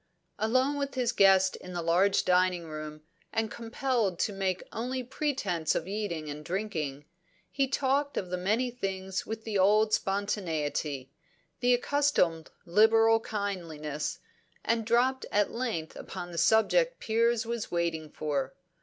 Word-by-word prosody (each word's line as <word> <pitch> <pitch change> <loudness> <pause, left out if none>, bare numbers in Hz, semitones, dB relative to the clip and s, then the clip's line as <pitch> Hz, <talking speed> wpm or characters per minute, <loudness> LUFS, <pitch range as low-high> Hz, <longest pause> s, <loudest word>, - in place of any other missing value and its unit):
Alone 255 +6 +2
with 280 -1 -3
his 245 -2 +1
guest 195 -4 +5
in 180 - -10
the 175 - -2
large 180 +4 +3
dining 180 -1 +3
room, 155 -1 -7 0.3
and 220 -1 -1
compelled 230 -4 -1
to 205 - 0
make 190 -1 -1
only 255 +3 -3
pretence 240 - -1
of 165 - -2
eating 195 -6 -3
and 150 +1 -6
drinking, 155 -7 -3 0.5
he 275 -1 +1
talked 280 +1 0
of 185 - -2
many 210 +8 0
things 190 -5 -4
with 220 0 -5
the 215 -3 -1
old 215 +3 +4
spontaneity, 160 -10 -1 0.5
the 245 0 +4
accustomed 245 - +1 0.2
liberal 225 +4 +5
kindliness, 170 -9 -4 0.5
and 225 -1 0
dropped 255 +3 +2
at 205 0 +2
length 230 -10 -3
upon 175 0 -7
the 170 - -7
subject - - +3
Piers 230 +1 +1
was 235 -1 -3
waiting 165 -2 -1
for. 140 -3 -3
200 Hz, 135 wpm, -29 LUFS, 170-235 Hz, 0.5 s, guest